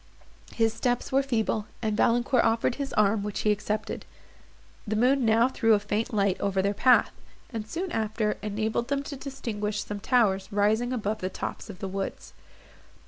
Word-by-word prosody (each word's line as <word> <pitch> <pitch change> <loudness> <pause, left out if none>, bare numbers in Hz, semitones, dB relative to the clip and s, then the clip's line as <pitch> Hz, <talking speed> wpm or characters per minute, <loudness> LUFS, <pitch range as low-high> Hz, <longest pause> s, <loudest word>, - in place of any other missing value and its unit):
His 225 -1 +2
steps 245 +1 -1
were 270 +1 +4
feeble, 220 -5 -1
and 215 -2 -1
Valancourt 240 +3 +3
offered 225 +2 +2
him - - -11
his 280 -1 -3
arm, 210 0 +3
which 210 0 -3
he 210 - +3
accepted. 210 +1 -2 0.8
The 215 - -1
moon 255 +3 +3
now 225 +2 +4
threw 225 -4 +3
a - - +1
faint 210 +4 -2
light 200 -3 +1
over 195 -1 0
their 200 +1 +1
path, 250 +5 +4 0.4
and, 220 -2 -4
soon 350 - -4
after, 215 -1 -1
enabled 215 +3 -1
them 280 0 -1
to 280 - -6
distinguish 215 -6 -4
some 205 0 -5
towers 200 -4 +2
rising 215 +4 +2
above 220 -3 -2
the 185 - -2
tops - - -6
of - - -8
the 195 - -5
woods. 195 +1 -5
220 Hz, 180 wpm, -27 LUFS, 205-245 Hz, 0.8 s, were